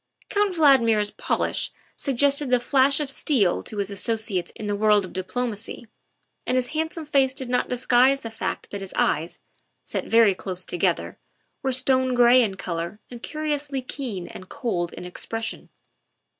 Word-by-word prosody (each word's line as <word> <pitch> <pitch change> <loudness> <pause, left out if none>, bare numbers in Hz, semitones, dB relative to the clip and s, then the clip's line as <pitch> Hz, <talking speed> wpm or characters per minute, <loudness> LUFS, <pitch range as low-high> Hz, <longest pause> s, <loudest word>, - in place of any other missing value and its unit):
Count 405 -2 +1
Valdmir 265 -9 +5
's 210 0 0
polish - - -1 0.2
suggested 280 +1 +1
the 250 -1 +4
flash 270 +3 +3
of 290 -2 -3
steel 235 - +2
to 215 - -8
his 200 0 -2
associates 210 -2 -1
in 215 - -7
the 205 0 -1
world 210 -1 +3
of 185 - -11
diplomacy, 215 +5 -4 0.6
and 250 - +1
his 250 -1 0
hand 320 +1 -2
some 325 -3 -5
face 270 -3 +2
did 260 -3 -5
not 250 0 0
disguise 255 +2 +3
the 230 - -7
fact 225 - -4
that 200 - -5
his 195 - -7
eyes, 160 +3 0 0.5
set - - -4
very 225 -3 +5
close 185 -1 -5
together, 175 - -1 0.4
were 270 -2 0
stone 260 0 +2
gray 245 +1 +6
in 205 -5 0
color 170 +1 -4
and 240 -1 -9
curi 310 +2 -3
ously 280 -2 -3
keen 240 -9 -4
and 185 - -11
cold 200 -11 -2
in - - -8
expression. 225 +5 -4
245 Hz, 170 wpm, -24 LUFS, 205-270 Hz, 0.6 s, gray